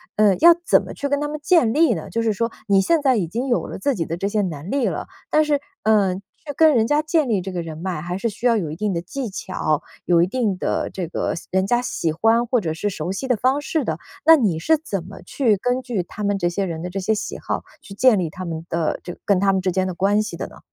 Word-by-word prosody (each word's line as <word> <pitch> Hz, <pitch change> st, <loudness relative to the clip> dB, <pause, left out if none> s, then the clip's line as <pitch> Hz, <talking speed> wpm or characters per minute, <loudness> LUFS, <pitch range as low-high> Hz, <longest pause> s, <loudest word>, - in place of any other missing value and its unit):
呃， 205 Hz, -2 st, +4 dB
要 340 Hz, +1 st, +8 dB
怎 -, -, +5 dB
么 -, -, -8 dB
去 285 Hz, -, -3 dB
跟 285 Hz, 0 st, +1 dB
他 295 Hz, -, -1 dB
们 300 Hz, +1 st, -5 dB
建 310 Hz, -10 st, +4 dB
立 310 Hz, -2 st, +4 dB
呢？ 160 Hz, -6 st, -6 dB
就 230 Hz, -, -1 dB
是 225 Hz, -1 st, +1 dB
说 230 Hz, +3 st, -1 dB, 0.2 s
你 195 Hz, -1 st, +4 dB
现 320 Hz, -, +2 dB
在 265 Hz, -3 st, +3 dB
已 180 Hz, -5 st, 0 dB
经 235 Hz, +10 st, -3 dB
有 240 Hz, -, 0 dB
了 -, -, -6 dB
自 280 Hz, +8 st, 0 dB
己 165 Hz, -, -2 dB
的 165 Hz, +2 st, -4 dB
这 195 Hz, -, -1 dB
些 210 Hz, +1 st, 0 dB
能 165 Hz, -3 st, -4 dB
力 275 Hz, -2 st, +1 dB
了， -, -, -3 dB, 0.2 s
但 310 Hz, -, +4 dB
是， 295 Hz, -1 st, +1 dB, 0.2 s
呃， 205 Hz, -4 st, +3 dB
去 210 Hz, +10 st, -10 dB
跟 315 Hz, -1 st, +6 dB
人 225 Hz, -1 st, +3 dB
家 295 Hz, +1 st, +3 dB
建 310 Hz, -2 st, +1 dB
立 205 Hz, -4 st, +1 dB
这 190 Hz, +1 st, -5 dB
个 180 Hz, -1 st, -3 dB
人 160 Hz, -2 st, -7 dB
脉， 175 Hz, -1 st, -4 dB
还 175 Hz, +2 st, -4 dB
是 230 Hz, +4 st, -1 dB
需 220 Hz, +3 st, -8 dB
要 235 Hz, -, +4 dB
有 165 Hz, -7 st, -3 dB
一 -, -, -5 dB
定 205 Hz, +3 st, -1 dB
的 170 Hz, -, -2 dB
技 240 Hz, +8 st, -5 dB
巧， 185 Hz, -6 st, -2 dB, 0.2 s
有 170 Hz, -1 st, +4 dB
一 -, -, +1 dB
定 215 Hz, -3 st, -1 dB
的 -, -, -1 dB
这 180 Hz, -3 st, -5 dB
个 170 Hz, -, -2 dB
喜 -, -, -9 dB
人 190 Hz, 0 st, +2 dB
家 240 Hz, +3 st, +2 dB
喜 170 Hz, -9 st, -2 dB
欢 225 Hz, +8 st, +2 dB
或 245 Hz, +1 st, +2 dB
者 160 Hz, -4 st, -2 dB
是 205 Hz, +6 st, -2 dB
熟 175 Hz, -2 st, -4 dB
悉 195 Hz, +8 st, -4 dB
的 250 Hz, -, +3 dB
方 260 Hz, +5 st, +2 dB
式 320 Hz, -1 st, -1 dB
的。 -, -, -2 dB, 0.3 s
那 325 Hz, -, +9 dB
你 205 Hz, -, +1 dB
是 320 Hz, -, +3 dB
怎 205 Hz, -, -4 dB
么 195 Hz, -, -11 dB
去 235 Hz, -7 st, +1 dB
根 245 Hz, +5 st, -1 dB
据 240 Hz, -8 st, -2 dB
他 210 Hz, +4 st, -8 dB
们 200 Hz, 0 st, +1 dB
这 175 Hz, -2 st, 0 dB
些 195 Hz, +3 st, -2 dB
人 165 Hz, -3 st, -5 dB
的 180 Hz, -, -4 dB
这 195 Hz, +2 st, -4 dB
些 195 Hz, +4 st, +1 dB
喜 210 Hz, -, -4 dB
好 -, -, -3 dB, 0.2 s
去 195 Hz, -, -11 dB
建 245 Hz, +2 st, +4 dB
立 170 Hz, -3 st, -1 dB
他 185 Hz, +4 st, -8 dB
们 165 Hz, -1 st, -5 dB
的 165 Hz, -2 st, -1 dB
这 175 Hz, -, -6 dB
个 -, -, -17 dB
跟 200 Hz, -3 st, +3 dB
他 195 Hz, 0 st, +3 dB
们 190 Hz, -, +1 dB
之 185 Hz, 0 st, 0 dB
间 185 Hz, +1 st, 0 dB
的 185 Hz, -, -3 dB
关 200 Hz, +4 st, +2 dB
系 215 Hz, -, -6 dB
的 -, -, -4 dB
呢？ -, -, -15 dB
200 Hz, 315 characters per minute, -22 LUFS, 180-250 Hz, 0.3 s, 那